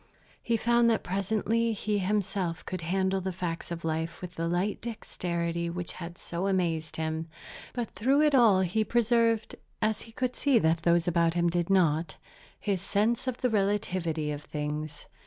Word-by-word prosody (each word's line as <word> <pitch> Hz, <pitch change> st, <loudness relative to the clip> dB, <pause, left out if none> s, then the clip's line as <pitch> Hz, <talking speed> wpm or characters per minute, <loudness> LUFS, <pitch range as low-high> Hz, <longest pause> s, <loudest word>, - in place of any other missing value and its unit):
He 230 Hz, -1 st, +1 dB
found 235 Hz, +1 st, +3 dB
that 225 Hz, -, +1 dB
presently 220 Hz, +4 st, 0 dB
he 210 Hz, 0 st, -1 dB
himself 190 Hz, -3 st, -1 dB
could 185 Hz, -2 st, -4 dB
handle 190 Hz, +3 st, 0 dB
the 190 Hz, +1 st, -2 dB
facts 175 Hz, -2 st, -4 dB
of 170 Hz, -1 st, -5 dB
life 160 Hz, +1 st, -2 dB
with 180 Hz, -1 st, -7 dB
the 165 Hz, -1 st, -2 dB
light 180 Hz, +4 st, -1 dB
dexterity 170 Hz, -7 st, -3 dB
which 175 Hz, 0 st, -5 dB
had 170 Hz, -1 st, -8 dB
so 175 Hz, +3 st, -3 dB
amazed 170 Hz, -5 st, 0 dB
him; 160 Hz, 0 st, -2 dB, 0.5 s
but 240 Hz, -2 st, -3 dB
through 270 Hz, +6 st, +2 dB
it 300 Hz, -1 st, +4 dB
all 225 Hz, -8 st, +6 dB
he 190 Hz, +4 st, +1 dB
preserved 230 Hz, 0 st, +2 dB, 0.2 s
(as 215 Hz, -1 st, 0 dB
he 225 Hz, -, -11 dB
could 250 Hz, +2 st, -2 dB
see 280 Hz, -4 st, +3 dB
that 160 Hz, -5 st, +2 dB
those 170 Hz, 0 st, +3 dB
about 170 Hz, -1 st, +2 dB
him 170 Hz, -1 st, +2 dB
did 175 Hz, 0 st, 0 dB
not) 165 Hz, -4 st, +2 dB, 0.4 s
his 195 Hz, -4 st, -1 dB
sense 215 Hz, +6 st, 0 dB
of 255 Hz, -2 st, -3 dB
the 250 Hz, -, +2 dB
relativity 185 Hz, -7 st, 0 dB
of 145 Hz, 0 st, -4 dB
things. 150 Hz, 0 st, -5 dB
185 Hz, 175 wpm, -29 LUFS, 170-220 Hz, 0.5 s, all